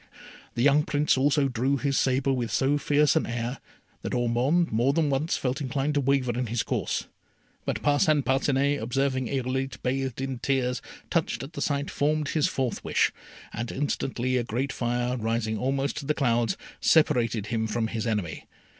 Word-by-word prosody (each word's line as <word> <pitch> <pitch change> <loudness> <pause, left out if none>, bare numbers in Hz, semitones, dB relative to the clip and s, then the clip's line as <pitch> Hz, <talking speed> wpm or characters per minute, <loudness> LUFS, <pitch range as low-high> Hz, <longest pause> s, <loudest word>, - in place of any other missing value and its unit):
The 120 - +1
young 145 +2 +5
Prince 150 0 +1
also 140 +1 +3
drew 130 +2 0
his 140 0 -1
sabre 135 +1 +2
with 120 -3 -1
so 145 +2 +2
fierce 145 -1 +3
an - - +1
air, 120 +2 -3 0.4
that - - -3
Ormond 125 +8 +2
more 120 +5 +2
than 155 -2 +1
once 145 +5 0
felt 130 +3 -2
inclined 140 +2 -1
to 145 - +2
waver 135 -2 +2
in 125 0 -1
his 115 +1 -1
course; - - -2 0.6
but - - -2
Parcin 145 0 +3
Parcinet, 135 +2 +1
observing 130 +2 0
Irolite 130 0 -2
bathed 130 -1 -1
in 135 -2 -3
tears, 125 -2 0 0.3
touched - - 0
at 135 - -9
the 145 - -5
sight, 140 -1 -1
formed 150 0 0
his 155 -2 +2
fourth 130 -4 -2
wish, - - +2 0.4
and 120 +1 -4
instantly 130 -2 -1
a 120 - +1
great 125 +5 -2
fire 120 +1 -1
rising 115 -1 -1
almost 135 +2 -1
to 140 - -5
the 150 - +1
clouds, 120 -6 +1 0.2
separated 115 -8 +3
him 110 -1 0
from 110 +1 -1
his 110 +1 -3
enemy. 105 -8 -2
130 Hz, 175 wpm, -27 LUFS, 120-140 Hz, 0.6 s, young